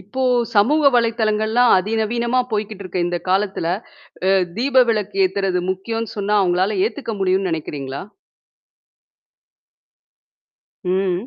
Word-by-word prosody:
இப்ப 260 +7 -5 0.3
சமூக 290 +10 +3
வலைத்தளங்கள்லாம் 225 0 +2
அதிநவீனமா 225 +5 0
போய்க்கிட்டு 210 -1 -3
இருக்க 185 0 -4
இந்த 175 0 -2
காலத்தில, 195 -2 0 0.6
அ - - +4 0.3
தீப 260 +1 +4
விளக்கு 210 -3 -1
ஏத்தறது 190 -1 -1
முக்கியம்னு 225 +4 -4
சொன்னா, 205 +1 0
அவங்களால 185 +2 +1
ஏத்துக்க 285 - -4
முடியும்னு 190 0 +1
நினைக்கிறீங்களா? 140 -4 -5 2.8
ம் 185 +2 -1
210 Hz, 100 wpm, -20 LUFS, 185-230 Hz, 2.8 s, அ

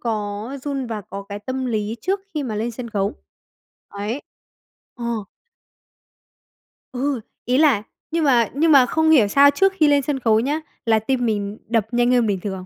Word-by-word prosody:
có 210 -1 -3
run 275 -3 -3
và 220 -2 -4
có 200 0 -8
cái 205 0 -5
tâm 260 +4 -4
lý 215 -1 -2
trước 385 - -1
khi 300 - -1
mà 225 -5 -4
lên 230 +3 -2
sân 235 0 -7
khấu, 200 0 -1 0.8
ấy. 210 +7 -4 0.7
Ờ. 235 -4 -3 1.7
Ừ, 260 -1 -1 0.2
ý 250 +2 +2
là 280 -9 +4 0.3
nhưng 330 -1 0
mà 240 -6 +3
nhưng 315 +3 +3
mà 270 -3 +7
không 320 +5 +1
hiểu 255 -10 +6
sao 280 +6 +6
trước 390 +6 +2
khi 310 -5 +4
lên 285 -1 +4
sân 275 0 -2
khấu 220 -3 +3
nhá, 290 +6 0 0.3
là 220 -1 +3
tim 245 +2 -1
mình 205 -2 -2
đập 225 -2 +1
nhanh 240 +1 +2
hơn 240 -3 +3
bình 195 -3 0
thường. 190 -1 -5
240 Hz, 185 wpm, -21 LUFS, 215-280 Hz, 1.7 s, mà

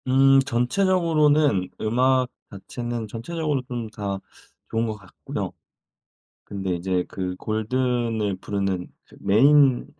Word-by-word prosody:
음 135 +1 +6
전체적으로는 150 - +2
음악 130 +3 +2 0.2
자체는 120 +3 -5
전체적으로 145 +6 -2
좀 120 -4 -4
다 100 -2 -3 0.5
좋은 115 +1 0
것 110 - -3
같고요. 95 -3 -6 0.9
근데 95 -2 -3
이제 90 +1 -1
그 90 -1 -4
골든을 110 -1 -1
부르는 95 -2 -2 0.2
그 - - -19
메인 135 +4 +5
120 Hz, 235 characters per minute, -24 LUFS, 100-135 Hz, 0.9 s, 음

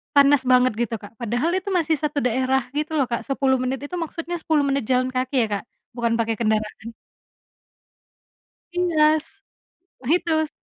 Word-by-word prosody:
panas 280 -1 +6
banget 250 -1 +5
gitu 235 -1 -1
Kak, 205 - -11
padahal 240 +8 0
itu 375 - -24
masih 320 -1 +1
satu 300 -1 -1
daerah 260 +2 +1 0.2
gitu 305 +1 -2
loh 280 - +3
Kak, 235 - -1
10 270 -1 +2
menit 255 +1 -2
itu 290 +5 -5
maksudnya 335 +2 -5
10 310 -2 +1
menit 275 -1 0
jalan 255 0 +2
kaki 255 +1 -2
ya - - -1
Kak - - -13 0.3
bukan 235 -1 0
pakai 225 0 0
kendaraan. 220 0 -2 1.8
Iya, 315 -3 +3 0.8
begitu 315 0 +1
270 Hz, 150 wpm, -23 LUFS, 240-310 Hz, 1.8 s, panas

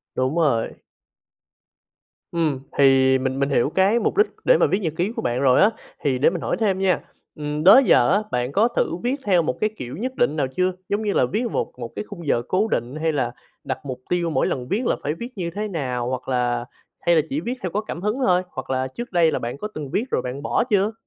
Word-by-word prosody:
Đúng 130 +4 0
rồi. 135 -9 +2 1.6
Ừm, 155 -6 0 0.2
thì 135 -1 +5
mình 130 +1 -2
mình 140 - +1
hiểu 140 -1 +2
cái 195 +7 +3
mục 235 - -1
đích 420 - +5 0.2
để - - +6
mà - - +3
viết 190 - +1
nhật 165 -7 -2
ký 185 +5 0
của 225 - -2
bạn 120 - -1
rồi 130 -2 +5
á, 205 - +6 0.3
thì 135 -3 +1
để 140 - +5
mình 170 -1 -4
hỏi - - -1
thêm 195 -4 +1
nha, 190 -3 +2 0.4
ừm, 150 0 -3
đó 200 +10 +9
giờ 120 - +5
á, 210 +2 +2
bạn 125 +2 -1
có 215 +7 +3
thử 235 -7 -1
viết 255 +3 +1
theo 185 -4 +4
một 155 -6 -1
cái 215 - +2
kiểu 125 +4 -6
nhất 255 +5 -4
định 150 - +1
nào 145 -4 0
chưa? 185 +7 0 0.2
Giống 205 +2 0
như 205 - 0
là - - +3
viết 210 - -2
một - - -2
một 120 -1 -5
cái - - -4
khung 175 -6 -9
giờ 120 - +2
cố 205 +4 +1
định, 125 - -2
hay 160 +1 0
là 145 - 0 0.3
đặt - - -3
mục 130 -2 -6
tiêu 175 -1 0
mỗi 135 -5 +1
lần 125 -2 -3
viết 225 - -1
là - - +2
phải 145 - -1
viết 235 +9 -7
như 170 -2 -2
thế 210 +5 -4
nào, 125 -9 -3
hoặc 130 0 -4
là 120 -2 0 0.3
hay 170 0 +3
là 160 - +5
chỉ 140 - -1
viết 235 +7 -2
theo 185 - -3
có 210 +4 -1
cảm 175 -5 -7
hứng 210 +6 -1
thôi, 180 -1 +4
hoặc 130 - -7
là 130 0 0
trước 240 - -7
đây 170 -3 +4
là - - -1
bạn 120 +3 -5
có 210 - -4
từng 150 -3 -5
viết 220 - 0
rồi - - +1
bạn 130 +2 -5
bỏ - - +1
chưa? 205 0 +2
160 Hz, 255 wpm, -22 LUFS, 130-200 Hz, 1.6 s, đó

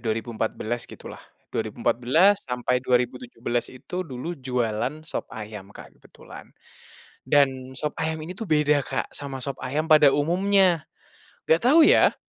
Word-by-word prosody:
2014 115 +1 -3
gitulah - - -10 0.3
2014 120 - +2
sampai 125 0 0
2017 120 -1 -1
itu 180 +8 -6
dulu 135 +5 -5
jualan 125 +2 -2
sop - - -5
ayam 105 -2 -8
Kak - - -13
kebetulan, - - -14 0.8
dan 130 -2 +2
sop 150 -1 -3
ayam 160 0 -2
ini 175 +3 -7
tuh 225 - -6
beda 150 -2 +3
Kak - - -3
sama 140 -2 -6
sop 140 - -4
ayam 150 +5 -2
pada 150 -3 +7
umumnya, 180 +3 +2 0.7
gak 160 +1 +4
tahu 315 +4 +7
ya, - - +5
135 Hz, 130 wpm, -25 LUFS, 120-155 Hz, 0.8 s, pada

